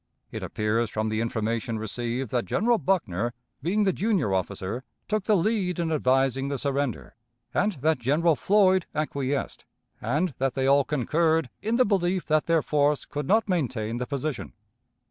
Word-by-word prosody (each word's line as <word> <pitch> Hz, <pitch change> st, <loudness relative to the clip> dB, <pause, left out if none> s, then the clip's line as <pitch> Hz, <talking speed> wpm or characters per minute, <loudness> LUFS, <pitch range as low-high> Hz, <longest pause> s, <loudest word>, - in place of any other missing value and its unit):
It -, -, -5 dB
appears 110 Hz, +2 st, -1 dB
from 110 Hz, +1 st, -2 dB
the 110 Hz, +1 st, -1 dB
information 115 Hz, 0 st, -2 dB
received 120 Hz, +3 st, -3 dB
that 120 Hz, -4 st, 0 dB
General 225 Hz, -, +2 dB
Buckner, 120 Hz, -, 0 dB, 0.3 s
being 195 Hz, +8 st, +1 dB
the 190 Hz, -2 st, +2 dB
junior 185 Hz, -, +1 dB
officer, 95 Hz, +5 st, -2 dB, 0.2 s
took 215 Hz, -2 st, -1 dB
the 215 Hz, -2 st, +4 dB
lead 185 Hz, -1 st, 0 dB
in 170 Hz, -2 st, -1 dB
advising 135 Hz, -2 st, +2 dB
the 140 Hz, 0 st, -2 dB
surrender, 140 Hz, -1 st, -2 dB, 0.4 s
and 210 Hz, 0 st, +1 dB
that 155 Hz, -1 st, +2 dB
General 150 Hz, +7 st, +2 dB
Floyd 190 Hz, 0 st, +3 dB
acquiesced, 140 Hz, -2 st, -2 dB, 0.4 s
and 150 Hz, +9 st, 0 dB
that 135 Hz, -1 st, 0 dB
they 135 Hz, -1 st, 0 dB
all 140 Hz, 0 st, +4 dB
concurred 160 Hz, +2 st, +1 dB
in 220 Hz, +3 st, 0 dB
the 255 Hz, +1 st, +4 dB
belief 185 Hz, -2 st, +1 dB
that 155 Hz, -1 st, +1 dB
their 165 Hz, -3 st, +3 dB
force 145 Hz, -1 st, +1 dB
could 145 Hz, -1 st, -5 dB
not 220 Hz, +5 st, +3 dB
maintain 120 Hz, -, -1 dB
the 125 Hz, 0 st, -3 dB
position. 140 Hz, -1 st, -4 dB
145 Hz, 165 wpm, -26 LUFS, 120-180 Hz, 0.4 s, the